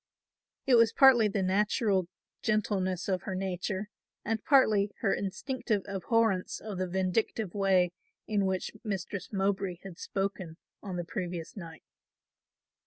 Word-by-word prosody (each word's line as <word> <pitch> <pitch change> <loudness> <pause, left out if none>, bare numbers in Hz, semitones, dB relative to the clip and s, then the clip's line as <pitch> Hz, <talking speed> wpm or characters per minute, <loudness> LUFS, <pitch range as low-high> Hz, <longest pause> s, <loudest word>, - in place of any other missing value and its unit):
It 265 - +3
was 230 -2 +6
partly 255 -5 +7
the 200 -1 -1
natural 195 0 +1 0.3
gentleness 190 -4 0
of 185 -2 0
her 190 - -4
nature 190 +2 -3 0.4
and 220 0 -1
partly 215 -7 +4
her 200 - +2
instinctive 215 +2 -2
abhorrence 200 0 0
of 205 -4 -6
the 185 - 0
vindictive 190 +2 -1
way 190 -3 +3 0.3
in 205 -3 +1
which 185 -1 -2
Mistress 195 -3 -4
Mowbray 195 -2 0
had 185 -3 -10
spoken 195 -4 -3 0.2
on 195 -3 -5
the 175 -1 -3
previous 175 -2 -5
night. 165 -5 -9
195 Hz, 130 wpm, -30 LUFS, 185-215 Hz, 0.4 s, partly